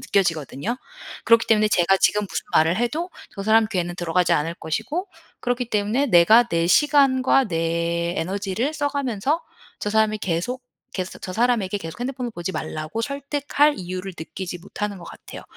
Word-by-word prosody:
느껴지거든요. 175 - -1 0.5
그렇기 230 0 +5
때문에 215 -1 +4
제가 190 -1 +3
지금 210 +2 +3
무슨 - - -4
말을 160 +3 +4
해도 300 +10 -1 0.3
저 195 - -5
사람 220 +2 +4
귀에는 175 -2 -1
들어가지 175 +1 +1
않을 160 +3 -1
것이고 305 - -3 0.3
그렇기 245 -1 -2
때문에 215 +7 +1
내가 215 +2 +7
내 170 -4 +1
시간과 270 - +4
내 170 0 -1
에너지를 200 - -2
써 290 -2 0
가면서 280 +1 -1 0.4
저 - - -2
사람이 215 0 +2
계속, 195 +8 -2 0.3
계소 185 -1 -5
저 185 - -6
사람에게 220 -3 +1
계속 165 +3 -8
핸드폰을 250 -1 -3
보지 175 -3 -5
말라고 155 +6 -4
설득할 285 +2 +1
이유를 185 +1 -5
느끼지 180 +2 -6
못하는 200 +2 -5
것 175 - -11
같아요. - - -10
205 Hz, 380 characters per minute, -23 LUFS, 175-250 Hz, 0.5 s, 내가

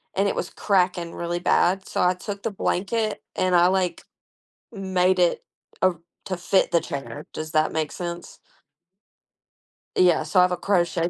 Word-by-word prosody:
and 200 +1 +2
it - - -1
was 180 - -3
cracking 180 -4 0
really 170 0 -3
bad. 190 +1 +2
So - - -2
I 180 +1 +4
took 200 +2 -7
the 225 - -1
blanket 210 +3 -1
and 185 -1 +1
I 175 +1 +6
like 185 -1 0 0.7
made 190 -2 +1
it, 175 -1 +2 0.4
uh, 185 -1 +4 0.3
to 185 - -2
fit 180 +1 +2
the 170 - +3
chair. 140 +1 -6
Does 155 0 -5
that 155 -1 +2
make 155 -2 -2
sense? 175 -1 -6 1.6
Yeah, 180 -3 +4
so 190 - +2
I - - +8
have 180 - +2
a 180 - -1
crochet 175 -3 +1
180 Hz, 170 wpm, -24 LUFS, 175-190 Hz, 1.6 s, I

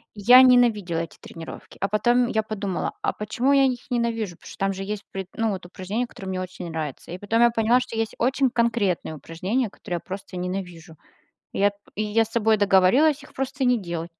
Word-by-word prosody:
и 205 - -9
я 250 +5 +9
ненавидела 230 -9 +4
эти 165 - -8
тренировки. 165 -1 -10
А 195 - +1
потом 240 +4 +2
я 220 -3 0
подумала: 200 -4 -3
"А - - 0
почему 235 +6 -1
я 275 -1 +5
их 255 0 -3
ненавижу?" 230 -6 -1
Потому - - -13
что, - - -11
там 195 0 0
же 195 - -5
есть 210 +1 -4
при 190 -1 -5
ну, 225 -1 0
вот, 185 -3 -5
упражнения, 190 +7 -4
которые 195 -4 -9
мне 185 -1 -2
очень 180 -1 -7
нравятся. 155 -1 -5
И 180 - -5
потом 220 +4 +1
я 240 - +7
поняла, 230 +2 +3
что 250 -2 -6
есть 225 -1 -2
очень 260 +2 +2
конкретные 230 -9 0
упражнения, 190 - -2
которые 175 -2 -5
я - - -5
просто 190 0 -8
ненавижу, 180 -2 -5 0.6
и - - -4
я 205 - +5
т - - -26 0.2
и 215 - -1
я 215 +2 +2
с - - -14
собой 225 -1 +3
договорилась 210 +10 +4
их - - -16
просто 270 +1 -3
не 250 -1 +4
делать. 170 -4 -5
210 Hz, 220 wpm, -24 LUFS, 185-240 Hz, 0.6 s, я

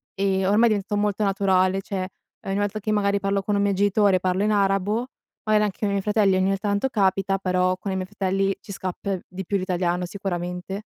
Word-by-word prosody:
e 190 -1 +1
ormai 210 +4 +4
è - - +3
diventato 205 0 -2
molto 210 0 0
naturale, 195 -1 +2
cioè 190 -1 -4 0.4
ogni 195 0 -1
volta 205 +1 -1
che 215 +1 -2
magari 200 -1 +2
parlo 195 0 0
con 205 +1 0
un 200 - +2
mio 200 0 +2
genitore, 200 0 +3
parlo 185 +2 0
in 215 - +2
arabo, 200 +3 +1 0.4
magari 215 -1 +3
anche 200 -3 -4
con 210 - 0
i - - -1
miei 200 - 0
fratelli 210 -2 +3
ogni 195 +1 +1
tanto 205 +5 0
capita, 195 -3 +1
però 185 -1 +1
con 195 +2 -5
i - - -2
miei 185 -1 -2
fratelli 195 0 0
ci - - -10
scappa 190 +1 -3
di 185 +1 -7
più 200 - 0
l'italiano 180 -1 -1
sicuramente. 180 +1 -4
195 Hz, 215 wpm, -24 LUFS, 185-205 Hz, 0.4 s, ormai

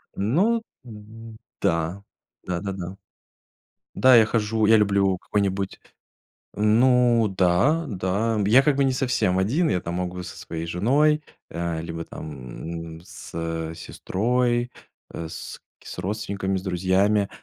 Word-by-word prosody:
Ну 185 - +2 1.0
да, 85 +4 0 0.4
да-да-да. 95 +1 -4 1.0
Да, 130 -1 +6
я 115 -2 +7
хожу 110 -1 0
я 110 +1 +6
люблю 100 -2 +2
какой-нибудь 100 0 -2 0.8
Ну 115 0 +3
да, 100 - +3
да, 105 +2 -1
я 115 +6 +6
как 145 0 +2
бы 140 - +2
не 135 - +2
совсем 120 -7 +1
один, 140 - +1
я, 90 - +1
там, 85 +1 -4
могу 90 0 -3
со - - -9
своей 80 0 -6
женой, 140 - +2 0.3
э, 85 -1 -3
либо 85 0 -5
там, 80 +4 -8
м, - - -14
с 85 - -12 0.4
сестрой, 120 +7 -1 0.4
э, 85 - -6
с 80 - -8 0.2
с - - -9
родственниками, 95 -1 -2
с - - -4
друзьями, 95 +2 +1
100 Hz, 125 wpm, -24 LUFS, 90-120 Hz, 1.0 s, я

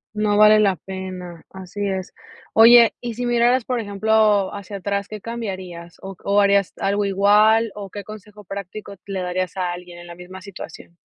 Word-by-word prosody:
No 210 -1 +1
vale 215 0 +7
la 200 -3 +2
pena, 185 -2 -8
así 190 +2 -6
es. 190 -2 -4 0.4
Oye 230 +1 +7
y 240 -1 -5
si 245 +2 -4
miraras, 240 +1 +2
por 250 -1 -1
ejemplo, 210 -1 +1
hacia 200 0 -7
atrás. 200 +1 -3
¿Qué 215 0 -8
cambiarías, 190 -7 -7
o 195 0 -9
o, 200 +1 +3
harías 200 -2 +2
algo 200 +1 0
igual? 210 +3 +3
¿O 200 -2 -8
qué 205 +1 -8
consejo 210 0 -12
práctico 200 +1 -8
le 195 -2 -4
darías 180 +1 -3
a 180 -2 -2
alguien 175 0 -10
en 175 - -12
la 170 - -10
misma 180 +2 -11
situación? 185 -3 -11
200 Hz, 180 wpm, -21 LUFS, 185-215 Hz, 0.4 s, vale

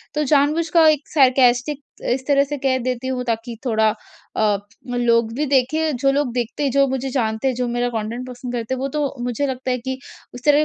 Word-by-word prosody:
तो 300 - +1
जानबूझ 295 +3 +2
का 325 0 +5
एक 300 -1 0
सार्कास्टिक 260 0 +4 0.3
इस 260 +2 -1
तरह 280 -1 +4
से 290 +1 -4
कह 265 -1 +1
देती 255 0 -2
हूँ 255 -1 -2
ताकि 230 0 -3
थोड़ा 220 -3 +3 0.5
अ, 210 -2 +3 0.4
लोग 230 -2 +2
भी 290 +5 -1
देखें। 285 +3 +1
जो 275 +2 +2
लोग 280 -3 0
देखते 245 +3 -2
हैं, 275 - +1
जो 275 +1 +4
मुझे 265 0 -2
जानते 225 -2 -1
है, 260 - +1
जो 250 0 -2
मेरा 240 +1 0
कंटेंट 230 +2 -4
पसंद 245 0 -7
करते 240 +1 -2
हैं 255 - -3
वो 270 - -1
तो 290 -1 -2
मुझे 245 +3 -1
लगता 260 -1 -3
है 250 - +1
कि 260 +2 -4 0.4
उस 245 - -10
तरह 295 -1 +6
260 Hz, 220 wpm, -21 LUFS, 240-280 Hz, 0.5 s, तरह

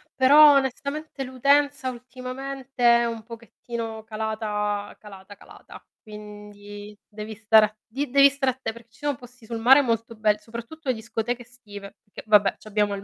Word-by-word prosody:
però 290 +3 +7
onestamente 280 +2 -2
l'utenza 280 +1 +1
ultimamente 255 0 -1
è - - +1
un 230 -1 -4
pochettino 230 -1 -8
calata 215 -2 -3
calata, 200 -1 -13
calata - - -15 0.2
quindi 210 -1 -11
devi 215 +1 -8
stare 220 0 +5
a 215 0 -9
di 275 +5 -4
devi 280 +2 +6
stare 270 -2 -1
atte 260 -2 -5
perché 230 0 -15
ci 240 - -23
sono 290 -4 -1
posti 245 -1 -16
sul 230 0 -5
mare 265 +5 +7
molto 230 -2 -2
bel 215 -1 +1
soprattutto 235 +8 -10
le 255 - +1
discoteche 225 +2 -4
estive, 205 -5 -12
perché 205 - -12
vabbè 205 -2 +5
c'abbiamo 210 -1 -1
il 195 - -8
230 Hz, 155 wpm, -24 LUFS, 210-260 Hz, 0.2 s, però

